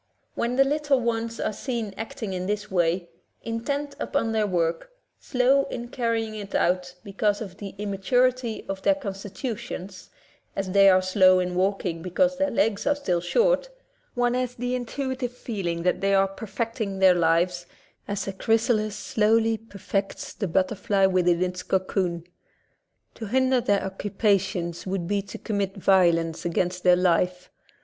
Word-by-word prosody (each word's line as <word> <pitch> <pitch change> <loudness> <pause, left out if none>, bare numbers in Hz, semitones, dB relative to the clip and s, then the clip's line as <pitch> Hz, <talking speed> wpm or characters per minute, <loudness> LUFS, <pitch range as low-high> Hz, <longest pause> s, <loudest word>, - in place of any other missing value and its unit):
When 235 +1 -1
the 270 - +6
little 290 -1 +1
ones 230 -1 -2
are - - -1
seen 230 -4 -4
acting 220 -2 -5
in 185 0 -3
this 210 0 -3
way, 175 0 +1 0.4
intent 280 +6 -3
upon 230 -5 -1
their 215 -1 +1
work, 170 - -1 0.3
slow 265 +2 +2
in 240 -1 -6
carrying 230 -3 -1
it 205 -2 -6
out 180 0 +1
because 205 +1 0
of 195 -5 -8
the 200 -2 -8
immaturity 230 +4 0
of 195 0 -4
their 295 - +3
con 220 -9 -5
stitutions, 200 -1 -6 0.5
as 195 -1 -2
they 195 0 +7
are 185 0 +4
slow 185 0 +5
in 180 0 -1
walking, 185 -2 -1
be 180 - -5
cause 275 +9 +2
their 285 0 +2
legs 220 -2 0
are 290 - +3
still 180 -12 -1
short, - - +2 0.5
one 245 0 +2
has 250 -1 -1
the 245 +1 -2
in 245 -1 -2
tuitive 260 -1 -3
feeling 190 -9 -4
that 180 - +1
they 195 0 +3
are 195 0 +4
perfecting 220 0 -4
their 190 -1 +6
lives, 175 +1 +1 0.4
as 200 -1 -3
a 195 - -3
chrysalis 220 0 +1
slowly 225 +1 +2
perfects 200 -2 -4
the 200 - -3
butter 185 +4 +1
fly 195 -1 +1
within 180 -2 +3
its 180 0 -3
cocoon. 185 -2 -1 0.9
To 220 - -7
hinder 260 +2 +2
their 205 -4 +2
occu 195 +2 -5
pations 190 -5 0
would 185 -2 -2
be 205 +1 0
to 195 - -9
commit 200 -3 -2
violence 170 -4 +3
against 180 +1 -1
their 180 -1 +6
life. 180 0 +1
200 Hz, 165 wpm, -25 LUFS, 185-235 Hz, 0.9 s, they